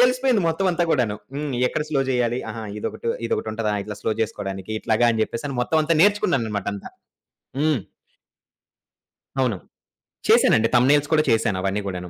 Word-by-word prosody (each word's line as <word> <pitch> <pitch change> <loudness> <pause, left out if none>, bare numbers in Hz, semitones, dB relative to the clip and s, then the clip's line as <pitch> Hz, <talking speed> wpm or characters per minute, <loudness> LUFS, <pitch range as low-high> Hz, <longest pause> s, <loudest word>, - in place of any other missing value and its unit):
తెలిసిపోయింది 250 -4 +3
మొత్తమంతా 180 +1 +1
గూడాను. 120 -8 +1 0.2
హ్మ్. 145 -1 -3
ఎక్కడ 150 - -1
స్లో 140 - +1
జేయాలి? 120 -2 +1
అహా! 110 0 -6 0.2
ఇదొకటు 115 - -4 0.2
ఇదొకటుంటదా? 110 -1 -2
ఇట్లా 105 - -6
స్లో - - -1
జేసుకోడానికి, 95 -2 -4
ఇట్లాగా 115 +1 +2
అని 110 - -2
చెప్పేసని 135 +4 -5
మొత్తమంతా 160 +4 +1
నేర్చుకున్నానన్నమాట 115 - +1
అంతా. 100 - -9 0.7
హ్మ్. 150 -6 +2 1.6
అవును. 125 -6 +1 0.7
చేశానండి. 115 +1 +5
థంబ్‌నెయిల్స్ 140 +4 +4
కూడా 155 -1 +4
చేశాను, 110 -3 +2
అవన్నీ 100 +2 -1
కూడాను. 90 -2 -5
120 Hz, 135 wpm, -23 LUFS, 110-155 Hz, 1.6 s, చేశానండి